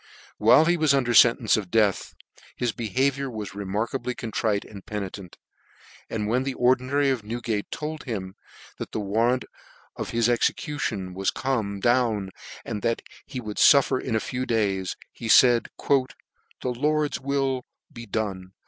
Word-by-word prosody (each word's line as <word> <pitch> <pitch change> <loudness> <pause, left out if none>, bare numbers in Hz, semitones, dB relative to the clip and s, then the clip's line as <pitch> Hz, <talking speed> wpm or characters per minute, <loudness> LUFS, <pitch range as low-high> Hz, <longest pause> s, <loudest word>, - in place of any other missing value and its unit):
While 160 - +6
he 175 +1 +3
\vas 155 -3 +3
under 125 -3 +1
fentence 115 -1 +6
of 100 -4 -4
death, 105 -3 +1 0.4
his 120 -2 -1
be 110 0 -5
haviour 135 +2 0
was 105 -4 -6
remarkably 105 +6 -3
contrite 110 -2 -1
and 100 -3 -11
penitent; 100 -3 -6 0.7
and 105 -2 -2
when 120 +4 +1
the 135 0 -3
Ordinary 130 +3 +2
of 125 -5 -2
Newgate 110 -1 -3
told 155 0 -5
him; 95 -7 -4 0.5
that - - -6
the - - -1
warrant 115 +5 +1 0.5
for - - -4
his 115 -1 +1
execution 120 -5 -1
was 95 +1 0
come 110 -7 -2
down, 115 -4 +1 0.3
and 105 -3 -4
that 115 -1 -1 0.2
he 135 -2 -5
would 105 -3 -6
luher 140 -2 +5
in 115 - -2
a - - +3
few 125 +3 -4
days, 100 -5 0 0.2
he 115 - -7
faid, 120 0 +6
" - - -45
The 130 -1 -2
Lord's 150 +4 0
wiil 135 -1 -1 0.3
be 120 0 -9
done 95 -3 -3
115 Hz, 155 wpm, -25 LUFS, 105-130 Hz, 0.7 s, While